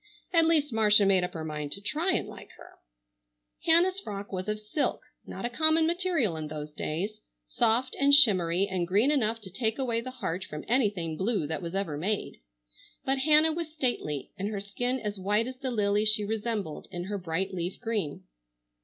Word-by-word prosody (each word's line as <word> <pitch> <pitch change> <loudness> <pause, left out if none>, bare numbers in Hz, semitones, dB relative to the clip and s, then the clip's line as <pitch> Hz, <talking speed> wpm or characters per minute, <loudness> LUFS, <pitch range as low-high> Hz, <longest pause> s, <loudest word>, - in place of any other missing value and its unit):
At 330 -1 +5
least 295 -5 +2
Marcia 210 -2 +5
made 190 -2 +4
up 180 0 -4
her 160 -1 -4
mind 150 -2 -5
to - - -6
try 310 - -1
and - - -1
like - - -11
her. - - -16 0.9
Hannah's 355 +4 +4
frock 200 - -7
was 185 0 -4
of 210 0 -2
silk, 215 +8 -2 0.3
not - - -6
a - - 0
common 315 +4 +4
material 335 - 0
in 155 -1 -4
those 150 0 -6
days, 190 +9 -4 0.2
soft 225 - +1
and 280 +1 +4
shimmery 190 - +5
and 185 -3 -2
green 210 +10 +3
enough 230 -6 +1
to 190 -3 -10
take 220 +3 -1
away 235 -4 -1
the 255 - -6
heart 195 -8 -4
from 150 -3 -8
anything 205 -10 0
blue 205 -3 0
that 160 +4 -4
was 170 +1 -5
ever 195 -7 -2
made, 200 +5 -2 0.7
but 270 0 +1
Hannah 310 +3 +5
was 330 -1 -4
stately 240 - -2
and 200 +2 -2
her 210 -2 -3
skin 245 +6 -2
as 210 -3 -4
white 205 +4 +1
as 255 +1 -7
the 265 0 -4
lily 210 -3 +1
she 215 -1 +2
resembled, 210 -6 -3
in 175 -1 -5
her 200 +2 -4
bright 185 +2 -2
leaf 175 0 -4
green. 215 -11 -3
210 Hz, 195 wpm, -28 LUFS, 185-260 Hz, 0.9 s, At